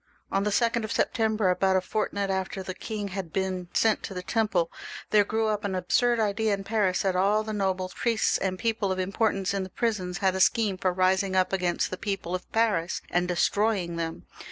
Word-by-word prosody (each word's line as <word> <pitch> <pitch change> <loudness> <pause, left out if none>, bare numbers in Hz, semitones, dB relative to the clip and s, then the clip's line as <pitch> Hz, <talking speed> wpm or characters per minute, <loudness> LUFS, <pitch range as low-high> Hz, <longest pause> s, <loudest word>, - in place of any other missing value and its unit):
On 195 - +1
the 210 - +1
2d 235 +2 +1
of 215 - -4
Sep - - +1
tember, 220 -4 +2
about 190 +1 +2
a - - +5
fortnight 200 0 -2
after 190 0 -2
the 185 - -5
king 205 +1 -5
had 185 -3 -5
been 185 -1 -2
sent 220 -1 +2
to 195 - -7
the 180 - -4
Temple, 200 -6 0 0.4
there 210 -1 +6
grew 220 +2 -1
up 210 0 -1
an 195 -2 -2
absurd 235 +6 +2
idea 215 0 +1
in 195 - -8
Paris 195 -3 +1
that 190 -2 +1
all 200 +4 +3
the 215 0 -5
nobles, 190 -2 -1
priests, 230 -3 +1
and 185 -1 -1
people 220 -2 0
of 190 - -1
importance 195 +1 0
in 200 - -1
the 190 - -5
prisons 185 -4 -2
had 190 -2 +2
a 190 - -2
scheme 200 0 +3
for 185 - +1
rising 185 +1 +1
up 185 +1 +2
against 180 -2 0
the 185 - -3
people 195 -3 -3
of 185 - -5
Paris 210 -7 +1
and 175 0 +1
destroying 180 0 +1
them. 165 -1 -4
195 Hz, 215 wpm, -27 LUFS, 185-215 Hz, 0.4 s, there